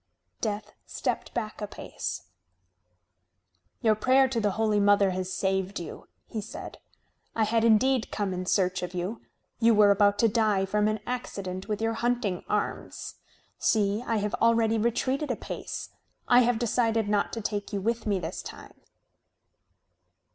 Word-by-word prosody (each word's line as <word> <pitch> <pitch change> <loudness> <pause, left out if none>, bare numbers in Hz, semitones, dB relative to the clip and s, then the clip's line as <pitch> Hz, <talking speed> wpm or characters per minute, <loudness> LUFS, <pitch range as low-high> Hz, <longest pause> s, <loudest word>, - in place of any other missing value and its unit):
Death 210 -1 -3 0.2
stepped - - -3
back 215 -2 -3
a 210 - -2
pace. - - -5 1.6
"Your 220 -2 +4
prayer 260 +5 +4
to 240 -2 -1
the 205 -2 +1
Holy 215 -1 +1
Mother 200 -1 +4
has 185 0 -3
saved 190 0 -1
you," 170 - -8 0.2
he 220 - -5
said. 205 - -8 0.6
"I 225 - +2
had 225 +1 +2
indeed 230 +2 +3
come 200 -3 -2
in 180 0 -4
search 185 -1 +1
of 180 0 -5
you. 180 +6 -3 0.4
You 230 -1 +5
were 205 -1 +6
about 205 0 +4
to 230 - +4
die 210 -3 +2
from 210 +2 +1
an 215 0 -1
accident 195 -7 -4
with 215 0 -2
your 225 0 +1
hunting 235 -5 -1
arms. - - -3 0.4
See, 210 0 +2
I 230 - +1
have 210 0 -1
already 230 -1 +3
retreated 260 +6 0
a - - 0
pace. - - -6 0.4
I 245 - +7
have 245 -1 +3
decided 225 -2 +1
not 205 -1 +1
to 230 - -3
take 205 -1 -3
you 200 - -1
with 230 +3 -1
me 200 -2 +2
this 175 0 -4
time." - - -10
215 Hz, 160 wpm, -27 LUFS, 200-230 Hz, 1.6 s, I